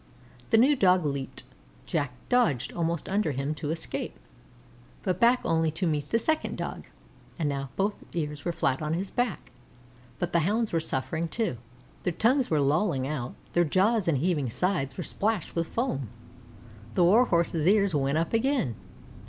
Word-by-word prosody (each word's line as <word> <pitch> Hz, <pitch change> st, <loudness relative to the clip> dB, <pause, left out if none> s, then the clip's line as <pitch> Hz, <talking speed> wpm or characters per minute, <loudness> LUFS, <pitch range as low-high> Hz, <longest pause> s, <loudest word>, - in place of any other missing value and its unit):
The 225 Hz, -, +5 dB
new 270 Hz, +6 st, +5 dB
Dog 185 Hz, -, +4 dB
leaped. 140 Hz, -2 st, -3 dB, 0.4 s
Jack 125 Hz, -, -1 dB
dodged 230 Hz, -, +2 dB
almost 170 Hz, -2 st, -1 dB
under 195 Hz, -6 st, 0 dB
him 135 Hz, +3 st, -2 dB
to 150 Hz, -1 st, -5 dB
escape, 160 Hz, +1 st, -4 dB, 0.9 s
and 185 Hz, -2 st, 0 dB
back 240 Hz, +2 st, +5 dB
only 160 Hz, -1 st, +2 dB
to 180 Hz, +4 st, -2 dB
meet 150 Hz, -3 st, -1 dB
the 230 Hz, -, +3 dB
second 315 Hz, +7 st, 0 dB
Dog; -, -, -5 dB, 0.5 s
and 160 Hz, -4 st, 0 dB
now 140 Hz, -1 st, -2 dB
both 200 Hz, +2 st, -1 dB
ears 150 Hz, -3 st, -3 dB
were 175 Hz, -, 0 dB
flat 135 Hz, -4 st, 0 dB
on 155 Hz, +1 st, -1 dB
his 190 Hz, +3 st, -3 dB
back. 245 Hz, -, -2 dB, 0.7 s
But 175 Hz, +4 st, -3 dB
the 170 Hz, -, +4 dB
Hounds 210 Hz, +6 st, 0 dB
were 165 Hz, -, +3 dB
suffering 160 Hz, +2 st, -1 dB
too. 175 Hz, -, -2 dB, 0.4 s
Their 180 Hz, -, -1 dB
tongues 250 Hz, -, +2 dB
were 155 Hz, -, +2 dB
lolling 145 Hz, 0 st, +1 dB
out; 135 Hz, -4 st, -4 dB, 0.2 s
their 175 Hz, -, +4 dB
jaws 190 Hz, +5 st, +2 dB
and 160 Hz, -4 st, +3 dB
heaving 150 Hz, -3 st, 0 dB
sides 135 Hz, -, -1 dB
were -, -, -3 dB
splashed 210 Hz, -4 st, -1 dB
with 165 Hz, -1 st, 0 dB
foam. 185 Hz, -, -2 dB, 0.9 s
The 180 Hz, -, +4 dB
Warhorse's 170 Hz, -5 st, +3 dB
ears 200 Hz, -2 st, +4 dB
went 140 Hz, 0 st, +1 dB
up 165 Hz, +5 st, -1 dB
again. 245 Hz, -, +1 dB
170 Hz, 170 wpm, -28 LUFS, 145-205 Hz, 0.9 s, The